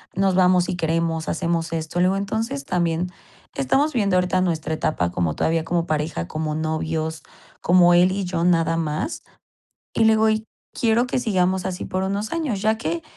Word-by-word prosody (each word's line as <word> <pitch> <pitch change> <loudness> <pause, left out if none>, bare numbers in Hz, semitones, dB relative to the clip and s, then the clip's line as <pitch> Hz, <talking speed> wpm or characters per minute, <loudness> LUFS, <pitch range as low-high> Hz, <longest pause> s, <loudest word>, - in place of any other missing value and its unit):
nos 190 0 +2
vamos 180 -1 +4
si 185 - -3
queremos, 165 -1 -1
hacemos 170 -1 -1
esto". 160 +1 -3
Le 180 - +4
digo: 190 +1 +2
"Entonces, 200 -7 -3
también 175 +1 -1 0.4
estamos 275 - +1
viendo 200 -6 +2
ahorita 180 0 +1
nuestra 160 -3 -1
etapa 90 - -1
como 85 -3 -1
todavía 165 0 0
como 170 -1 0
pareja, 150 - -2
como 155 - -3
novios, 160 0 -2 0.4
como 175 0 +5
él 180 +1 +5
y 195 0 -2
yo 175 -2 -2
nada 165 -2 +2
más", 155 - -2 0.7
y 225 - +3
le 220 - +6
digo: 220 0 +3
"Y 215 0 0 0.3
quiero 235 +1 +2
que 255 - -1
sigamos 190 -5 0
así 185 0 -3
por 185 0 -2
unos 200 +3 -2
años, 290 -12 -2
ya 220 +1 +2
que 330 +8 -3
180 Hz, 180 wpm, -22 LUFS, 160-200 Hz, 0.7 s, le